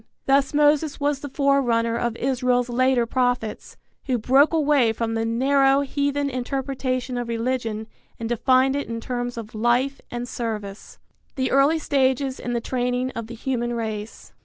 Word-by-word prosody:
Thus 275 0 +3
Moses 295 0 +2
was 285 -1 0
the 285 - -7
forerunner 260 -5 +1
of 235 -1 -1
Israel's 250 -1 0
later 255 0 +2
prophets, 245 -2 -2 0.3
who 255 -2 0
broke 270 +6 +4
away 290 -7 +3
from 225 0 -2
the 225 0 -1
narrow 270 +4 +3
heathen 285 0 -1
interpretation 255 -1 -2
of 240 - -4
religion 230 -2 -2 0.3
and 230 - -3
defined 255 +3 +3
it 285 - -2
in 230 0 -4
terms 245 0 -4
of 225 -2 -7
life 240 +5 +1
and 240 0 -5
service. 215 -4 -5
VI. - - -42
THE - - 0
EARLY 275 +4 +4
STAGES 265 -3 0
IN 245 - -4
THE 235 - -1
TRAINING 250 +1 -1
OF 230 -3 -6
THE 235 - -8
HUMAN 240 0 -2
RACE. 220 -2 -6
250 Hz, 160 wpm, -23 LUFS, 235-275 Hz, 0.3 s, broke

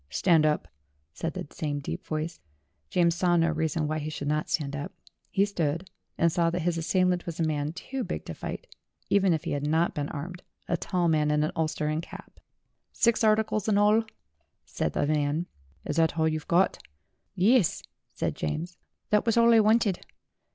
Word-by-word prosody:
"Stand 160 - +3
up," 150 - 0 0.5
said 165 - -4
the - - -4
same 150 -4 -3
deep 140 - -5
voice. 155 +2 -3 0.5
James 170 -1 +3
saw 175 0 +2
no 165 0 +3
reason 160 -1 -1
why 155 +1 -1
he 150 +1 -4
should 145 -2 -5
not 150 +1 0
stand 145 -2 -1
up; 145 - -5 0.4
he 195 - +2
stood, 170 -2 -2 0.3
and 170 0 +3
saw 170 0 +2
that 175 0 -2
his 175 0 +1
assailant 180 +2 +1
was 170 -1 -5
a - - +2
man 150 -1 -1
too 255 +9 -5
big - - -5
to - - -5
fight, - - -6 0.5
even 195 -2 +4
if 160 -3 0
he - - -3
had 145 0 -1
not 160 +3 +2
been 145 -1 -3
armed, 175 +5 -6 0.3
a 175 - +1
tall 175 0 0
man 155 -2 +2
in 150 0 +2
an 155 - 0
ulster 160 -2 -1
and 155 +1 0
cap. - - -12 0.5
"Six 235 -1 +2
articles 215 -1 +2
in 210 -2 +3
all," 210 +2 +4 0.6
said - - -2
the - - +1
man. 150 +2 0 0.4
"Is 150 - -3
that 160 -1 +2
all 160 0 +3
you 155 0 0
got?" 180 +2 +2 0.5
"Yuss," 200 +1 +3 0.3
said - - -2
James. 165 - -4 0.3
"That 210 +2 +3
was 230 - +3
all 235 0 +6
I 225 - +7
wanted." 215 -3 +3
165 Hz, 195 wpm, -27 LUFS, 155-185 Hz, 0.6 s, I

